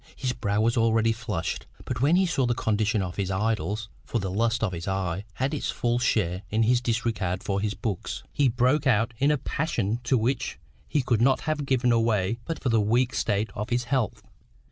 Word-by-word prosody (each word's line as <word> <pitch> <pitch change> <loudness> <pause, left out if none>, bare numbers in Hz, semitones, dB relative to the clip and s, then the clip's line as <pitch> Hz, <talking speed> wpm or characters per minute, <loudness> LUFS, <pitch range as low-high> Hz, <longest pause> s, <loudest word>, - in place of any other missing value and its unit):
His 130 -2 -2
brow 105 -4 -1
was 115 +2 +2
already 115 0 +3
flushed; 105 -7 -3 0.2
but 120 -2 -3
when 150 +5 +4
he 190 +1 +4
saw 135 -8 +1
the 120 - +1
condition 105 -1 +1
of 90 -2 -6
his 95 -2 -1
idols, 105 0 -1 0.2
(for - - -2
the 95 -4 -2
lust 115 +3 +1
of 110 - +1
the 85 +1 -4
eye 95 0 -2
had 135 +4 -1
its 150 - -2
full 120 0 0
share 95 -7 +1
in 110 +2 +2
his 120 +2 +3 0.2
regard 95 -5 -1
for 100 -1 -1
his 105 0 -1
books,) 105 - -4
he 145 - +3
broke 130 +5 +2
out 115 -1 +2
in 140 - +3
a 150 - +3
passion 120 - -1
to 130 +2 +3
which 120 +3 -1 0.3
he 145 - +1
could 120 -3 +1
not 135 +2 +4
have 150 -2 -2
given 125 -2 +2
way 110 0 +1
but 165 - -3
for 130 - +1
the 115 -2 +3
weak 120 +5 +2
state 105 0 0
of 105 +2 -4
his 120 0 +1
health. 130 -5 0
115 Hz, 210 wpm, -26 LUFS, 105-125 Hz, 0.3 s, when